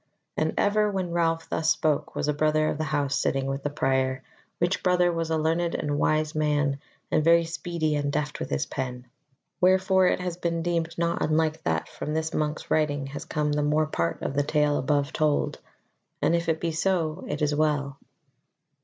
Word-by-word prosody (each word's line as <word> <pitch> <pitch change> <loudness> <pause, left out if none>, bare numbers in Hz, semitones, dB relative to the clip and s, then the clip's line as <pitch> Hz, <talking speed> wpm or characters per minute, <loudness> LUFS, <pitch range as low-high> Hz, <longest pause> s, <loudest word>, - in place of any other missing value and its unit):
And 155 0 0
ever 210 +1 +3
when 190 -3 -2
Ralph 165 -1 0
thus 160 0 0
spoke 155 -2 +1
was - - -1
a 150 - +2
brother 155 +1 +2
of 150 - -3
the 155 - 0
House 145 -2 0
sitting 135 -1 0
with 135 +1 -3
the 145 - -2
Prior, 130 -2 0 0.3
which 175 +2 0
brother 180 -1 +3
was 165 -1 -2
a 160 - +1
learned 165 +2 0
and 145 -1 -1
wise 155 0 +1
man 145 -2 +1 0.3
and 155 - +3
very 170 +1 +5
speedy 165 -1 -2
and 145 -1 -1
deft 150 0 -2
with - - -4
his 70 -1 -1
pen. 125 -2 -5 0.6
Wherefore 190 0 +4
it - - +1
has 180 -1 -4
been 170 -2 -1
deemed 170 -1 -1
not 170 0 0
unlike 155 0 +1
that 80 -1 0
from 150 - -5
this 160 +1 -1
monk's 150 0 -2
writing 145 -3 +1
has 145 +2 -6
come 150 -1 -1
the 150 0 +1
more 150 +1 +2
part 85 - -2
of - - -2
the 145 - +2
tale 150 0 +1
above 145 +1 0
told. 155 -2 0 0.6
And 170 - +2
if 170 0 -1
it 160 0 +1
be 165 0 -1
so, 165 -1 0
it 150 - -2
is 150 0 +2
well. 145 -2 0
155 Hz, 200 wpm, -26 LUFS, 145-165 Hz, 0.6 s, very